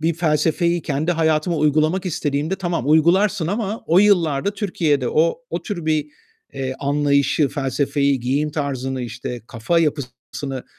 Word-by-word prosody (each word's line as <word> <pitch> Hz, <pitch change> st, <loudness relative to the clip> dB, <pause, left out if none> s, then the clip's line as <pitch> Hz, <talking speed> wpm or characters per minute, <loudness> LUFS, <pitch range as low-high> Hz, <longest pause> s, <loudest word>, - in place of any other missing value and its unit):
bir 160 Hz, +1 st, +1 dB
felsefeyi 170 Hz, +1 st, +1 dB
kendi 155 Hz, +4 st, -1 dB
hayatıma 160 Hz, +1 st, +1 dB
uygulamak 155 Hz, +5 st, +1 dB
istediğimde, 150 Hz, 0 st, -1 dB
tamam 175 Hz, -8 st, -2 dB
uygularsın 175 Hz, +3 st, +3 dB
ama 210 Hz, +2 st, -2 dB
o 170 Hz, +3 st, +4 dB
yıllarda 180 Hz, -5 st, +3 dB
Türkiye'de 160 Hz, -, 0 dB
o, 160 Hz, -, +2 dB
o -, -, -3 dB
tür 175 Hz, -7 st, -5 dB
bir, 155 Hz, -2 st, +1 dB, 0.5 s
eee, 130 Hz, -1 st, -4 dB
anlayışı, 140 Hz, 0 st, +2 dB
felsefeyi, 140 Hz, 0 st, 0 dB
giyim 140 Hz, +5 st, 0 dB
tarzını, 135 Hz, -3 st, -3 dB
işte, 120 Hz, +1 st, -6 dB
kafa 120 Hz, +10 st, 0 dB
yapısını, 135 Hz, -3 st, -3 dB
150 Hz, 135 wpm, -21 LUFS, 140-170 Hz, 0.5 s, o